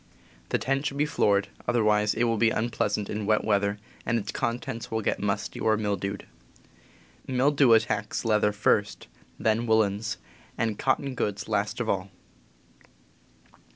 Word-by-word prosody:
The -, -, +2 dB
tent 135 Hz, +2 st, -1 dB
should 140 Hz, -, -4 dB
be 150 Hz, -, +2 dB
floored, 100 Hz, -8 st, +2 dB, 0.2 s
other 120 Hz, -2 st, +2 dB
wise 105 Hz, 0 st, +3 dB
it 115 Hz, -, +1 dB
will 115 Hz, -1 st, +1 dB
be 115 Hz, -, +5 dB
unpleasant 110 Hz, -2 st, -1 dB
in 105 Hz, -1 st, -4 dB
wet 110 Hz, 0 st, +3 dB
weather 100 Hz, -1 st, +1 dB, 0.3 s
and 115 Hz, -, 0 dB
its 105 Hz, -1 st, -3 dB
contents 120 Hz, +1 st, -3 dB
will 110 Hz, 0 st, -1 dB
get -, -, 0 dB
musty -, -, -2 dB
or 110 Hz, -1 st, +2 dB
mildewed. 100 Hz, -2 st, -2 dB, 1.0 s
Mildew 135 Hz, -1 st, +4 dB
at 110 Hz, -, +6 dB
tacks 105 Hz, +3 st, -3 dB
leather 105 Hz, -1 st, +3 dB
first, 105 Hz, 0 st, +1 dB, 0.3 s
then 110 Hz, +2 st, +1 dB
woolens, 110 Hz, 0 st, +1 dB, 0.4 s
and 110 Hz, -3 st, -1 dB
cotton 135 Hz, 0 st, 0 dB
goods 105 Hz, -4 st, -2 dB
last 105 Hz, +4 st, -1 dB
of 120 Hz, -, -2 dB
all. 95 Hz, -2 st, -1 dB
110 Hz, 155 wpm, -27 LUFS, 105-120 Hz, 1.0 s, at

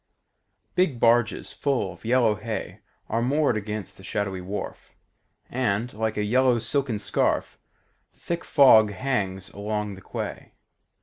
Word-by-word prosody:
Big 160 Hz, -10 st, +1 dB
barges 115 Hz, 0 st, +2 dB
full 125 Hz, -10 st, -1 dB
of -, -, -19 dB
yellow 115 Hz, -1 st, +3 dB
hay 110 Hz, +1 st, -5 dB, 0.3 s
Are 115 Hz, +2 st, 0 dB
moored 140 Hz, +1 st, +2 dB
against 105 Hz, -2 st, -4 dB
the 95 Hz, -, -14 dB
shadowy 95 Hz, -2 st, -2 dB
wharf, 95 Hz, +3 st, -6 dB, 0.5 s
And, 120 Hz, -1 st, -1 dB
like 110 Hz, 0 st, -2 dB
a 105 Hz, -, +1 dB
yellow 125 Hz, +3 st, +3 dB
silken 130 Hz, -1 st, -1 dB
scarf, 100 Hz, -, 0 dB, 0.5 s
The -, -, -32 dB
thick 170 Hz, 0 st, -3 dB
fog 120 Hz, -7 st, +6 dB
hangs 95 Hz, -5 st, -2 dB
along 105 Hz, 0 st, -3 dB
the 95 Hz, -, -11 dB
quay. -, -, -6 dB
110 Hz, 135 wpm, -25 LUFS, 100-125 Hz, 0.5 s, fog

